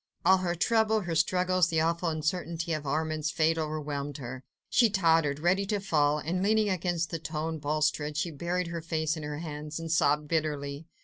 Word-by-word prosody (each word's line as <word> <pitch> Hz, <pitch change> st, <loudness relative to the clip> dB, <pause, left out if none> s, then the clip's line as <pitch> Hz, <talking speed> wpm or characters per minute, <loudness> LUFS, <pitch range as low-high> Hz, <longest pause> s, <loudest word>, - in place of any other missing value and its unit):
All 190 Hz, +2 st, +7 dB
her 175 Hz, -2 st, -1 dB
trouble, 220 Hz, +3 st, +2 dB
her 175 Hz, -3 st, -3 dB
struggles, 180 Hz, +2 st, +2 dB
the 160 Hz, -, +1 dB
awful 170 Hz, +2 st, +1 dB
uncertainty 165 Hz, +1 st, -2 dB
of 150 Hz, -2 st, -3 dB
Armand's 155 Hz, +1 st, -1 dB
fate 165 Hz, -1 st, +1 dB
overwhelmed 145 Hz, -2 st, -3 dB
her. 130 Hz, -1 st, -7 dB, 0.2 s
She 235 Hz, -3 st, +4 dB
tottered, 165 Hz, -7 st, +3 dB
ready 180 Hz, +5 st, +2 dB
to 205 Hz, 0 st, 0 dB
fall, 150 Hz, -6 st, +2 dB
and 170 Hz, +5 st, -2 dB
leaning 210 Hz, +1 st, +2 dB
against 175 Hz, -2 st, -1 dB
the 165 Hz, -, -1 dB
stone 160 Hz, +1 st, -3 dB
balustrade, 150 Hz, 0 st, 0 dB
she 170 Hz, +2 st, -1 dB
buried 175 Hz, +4 st, -2 dB
her 170 Hz, -1 st, -4 dB
face 160 Hz, -1 st, -1 dB
in 160 Hz, -, -6 dB
her 150 Hz, 0 st, -4 dB
hands 150 Hz, -1 st, -6 dB
and 165 Hz, -1 st, -5 dB
sobbed 150 Hz, -1 st, +2 dB
bitterly. 150 Hz, -1 st, -2 dB
160 Hz, 185 wpm, -29 LUFS, 150-175 Hz, 0.2 s, All